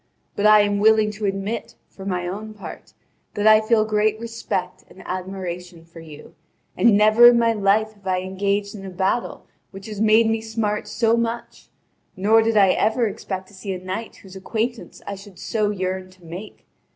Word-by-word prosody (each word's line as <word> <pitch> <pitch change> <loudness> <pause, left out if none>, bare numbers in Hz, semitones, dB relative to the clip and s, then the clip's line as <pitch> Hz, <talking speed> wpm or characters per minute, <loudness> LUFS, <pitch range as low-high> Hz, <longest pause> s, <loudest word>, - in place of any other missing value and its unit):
But 205 - +2
I 215 0 +7
am 205 0 0
willing 215 0 +4
to 210 0 -5
admit, 195 +3 -4
for 195 0 -11
my 180 -2 -2
own 215 +4 -6
part, 205 - -11 0.4
that 205 - -1
I 215 0 +7
feel 215 0 +2
great 215 0 +1
respect 225 -6 -4
and 190 - -14
admiration 180 -2 -6
for 165 0 -14
you, 155 -2 -13 0.4
and 225 -4 +4
never 215 +3 +7
in 240 0 +6
my 230 -1 +3
life 215 +1 +1
have 200 -2 -15
I 185 -1 0
engaged 200 +2 -2
in 200 -3 -9
a 195 - -6
battle 190 +6 -2 0.2
which 195 0 -11
has 210 -2 -6
made 220 +1 +5
me 225 0 0
smart 220 -2 -2
so 225 +1 +1
much, 235 0 -4 0.5
nor 215 +4 +4
did 225 0 +1
I 195 -2 +6
ever 220 +5 +2
expect 190 -2 -6
to - - -19
see 195 0 -5
a - - -4
knight 185 +5 -6
whose 190 -1 -15
acquaintance 225 +4 -4
I 200 - -5
should 200 -1 -12
so 215 -2 -1
yearn 185 -2 -3
to 185 -2 -20
make. 180 +6 -10
205 Hz, 190 wpm, -22 LUFS, 190-220 Hz, 0.5 s, I